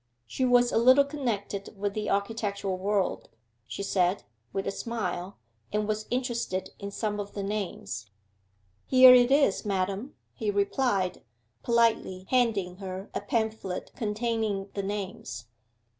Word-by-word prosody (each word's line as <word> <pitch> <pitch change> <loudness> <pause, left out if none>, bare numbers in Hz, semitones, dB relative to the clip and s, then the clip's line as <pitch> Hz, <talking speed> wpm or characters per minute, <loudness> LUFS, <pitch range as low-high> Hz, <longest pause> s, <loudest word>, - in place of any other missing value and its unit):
She 260 - -1
was 245 -1 +4
a - - +3
little 255 +4 +7
connected 220 -9 -3
with 200 0 -2
the 215 0 -2
architectural 200 -2 -1
world, 195 +1 -1 0.4
she 200 - -5
said, 185 -1 +1 0.3
with 195 - -2
a - - -1
smile, 195 -4 -4 0.3
and 210 0 0
was 215 0 -2
interested 240 -7 -2
in 200 - -5
some 210 0 -2
of 205 0 -5
the 200 - -3
names. 195 - -4 0.8
'Here 255 -1 +9
it 245 -1 +6
is, 275 -7 +3
madam,' 200 +5 -2 0.2
he 220 -4 -2
replied, 200 -2 0 0.4
politely 230 -6 +1
handing 215 -8 +1
her 190 0 -7
a - - -2
pamphlet 215 -3 -2
containing 215 -3 -1
the 200 - -2
names. 195 - -5
205 Hz, 135 wpm, -28 LUFS, 195-235 Hz, 0.8 s, Here